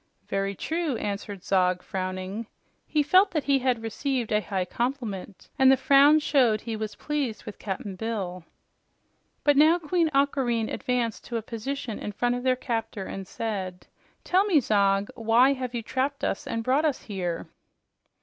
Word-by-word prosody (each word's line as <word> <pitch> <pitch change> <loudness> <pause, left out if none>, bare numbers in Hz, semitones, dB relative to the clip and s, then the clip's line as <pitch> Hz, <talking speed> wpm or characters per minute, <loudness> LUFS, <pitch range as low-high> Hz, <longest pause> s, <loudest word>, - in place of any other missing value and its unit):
"Very 195 0 -1
true," 320 - -2
answered 200 -2 -5
Zog, 180 -2 +2
frowning. 185 +3 -4 0.4
He 300 -1 +2
felt 370 +7 +5
that 310 -6 -1
he 275 -1 +3
had 250 -3 0
received 245 +1 -2
a 210 0 +3
high 190 -3 -2
compliment, 225 -4 -4
and 265 0 +7
the 265 - +5
frown 280 +2 +6
showed 250 -8 +3
he 230 -2 -4
was 215 -1 -4
pleased 285 -7 -3
with - - -8
Cap'n 195 -1 -5
Bill. 190 -5 -4 1.0
But 290 -1 +4
now 315 +4 +6
Queen 335 0 +1
Aquareine 270 -5 +1
advanced 245 -3 -1
to 235 - -3
a 225 - -4
position 230 +1 -5
in 210 - -5
front 245 +4 +1
of 245 - -2
their 255 0 +2
captor 225 -5 -3
and 195 -1 -6
said, 190 -5 -4 0.4
"Tell 370 +2 +3
me, 365 -8 +4
Zog, 200 -4 +2
why 235 +4 +4
have 255 -2 -5
you 230 - -3
trapped 270 +4 -2
us - - -2
and 230 - -2
brought 265 +6 +2
us 300 -5 0
here?" 180 -5 -3
230 Hz, 170 wpm, -26 LUFS, 200-275 Hz, 1.0 s, and